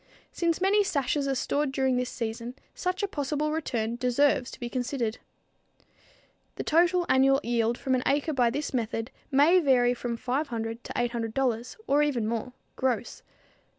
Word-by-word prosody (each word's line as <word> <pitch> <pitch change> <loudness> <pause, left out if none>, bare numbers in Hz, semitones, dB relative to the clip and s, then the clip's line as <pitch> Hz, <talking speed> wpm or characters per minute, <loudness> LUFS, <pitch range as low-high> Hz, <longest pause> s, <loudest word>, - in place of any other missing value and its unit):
Since 335 -2 0
many 405 +2 +4
sashes 285 -5 0
are 270 - 0
stored 285 +2 0
during 265 -1 +1
this 250 0 -1
season, 235 +1 -5 0.2
such 365 +2 -2
a - - +2
possible 300 -3 -2
return 235 -7 -2
deserves 250 +1 +2
to - - -11
be 240 - -4
considered. 245 -2 -2 1.4
The - - -4
total 350 +2 +3
annual 270 +1 +4
yield 235 0 +1
from 265 -2 -1
an 255 - +2
acre 290 +3 +1
by 245 -3 +3
this 285 +5 -3
method 225 0 -2 0.2
may 300 +6 +5
vary 250 -6 +3
from 240 -1 -4
$500 240 -3 -3
to - - -8
$800 240 0 -1
or 285 +1 +3
even 260 -7 +1
more 235 +2 -3 0.2
gross. 245 -3 -2
260 Hz, 155 wpm, -27 LUFS, 235-290 Hz, 1.4 s, may